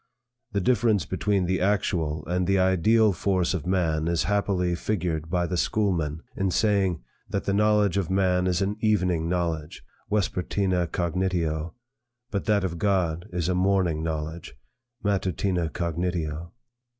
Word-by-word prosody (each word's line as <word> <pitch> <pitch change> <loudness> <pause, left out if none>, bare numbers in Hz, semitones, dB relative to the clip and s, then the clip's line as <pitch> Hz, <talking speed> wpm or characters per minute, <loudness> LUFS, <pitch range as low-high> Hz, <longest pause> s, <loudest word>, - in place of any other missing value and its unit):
The 100 - +1
difference 110 -5 +2
between 100 -3 0
the 95 +1 0
actual 85 -6 0
and 90 0 -1
the 95 0 +3
ideal 95 +4 +4
force 95 +1 0
of 85 -3 -3
man 80 -4 +1
is 85 -1 +1
happily 100 -3 +1
figured 85 -5 -2
by 90 -1 +1
the 85 +1 -2
schoolmen, 85 -7 0
in 95 0 0
saying, 95 - +1 0.3
that 100 0 -2
the 100 - -1
knowledge 105 -2 +3
of 95 -5 -1
man 95 -1 +2
is 90 +1 +1
an 100 +2 -2
evening 90 -6 +1
knowledge, 85 -4 -2 0.3
vespertina 95 -2 0
cognitio, 85 -2 -1 0.6
but 100 -3 -2
that 105 -2 +2
of 85 -3 -3
God 90 -4 0
is 90 -2 -1
a 90 - +1
morning 90 -3 +1
knowledge, 80 -1 -4 0.5
matutina 95 -3 0
cognitio. 85 -1 -3
90 Hz, 140 wpm, -26 LUFS, 85-100 Hz, 0.6 s, ideal